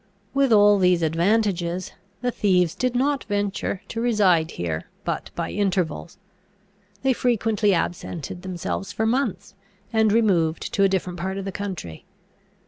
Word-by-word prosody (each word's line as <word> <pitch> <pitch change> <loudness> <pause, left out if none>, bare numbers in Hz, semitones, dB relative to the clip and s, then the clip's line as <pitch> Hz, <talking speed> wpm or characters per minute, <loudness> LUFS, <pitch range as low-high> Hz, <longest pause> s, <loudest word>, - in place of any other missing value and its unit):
With 275 -2 +2
all 205 -1 +6
these 180 -2 +3
advantages, 175 +1 +1 0.3
the 250 0 0
thieves 180 -7 +2
did 250 -1 -1
not 275 +2 +1
venture 205 -2 -2
to 230 - -3
reside 195 -9 +3
here 80 - -4
but - - -3
by - - -3
intervals: 185 -4 -1 0.9
they 265 -1 +3
frequently 225 -4 +1
absented 175 -1 -3
themselves 190 +2 -4
for 220 +4 -1
months, 220 -5 -1 0.4
and 220 -1 +3
removed 185 -8 +1
to 200 - +1
a 195 - +5
different 180 -2 -2
part 190 +2 -3
of 195 - -4
the 195 - -3
country. 185 - -6
195 Hz, 140 wpm, -24 LUFS, 175-220 Hz, 0.9 s, all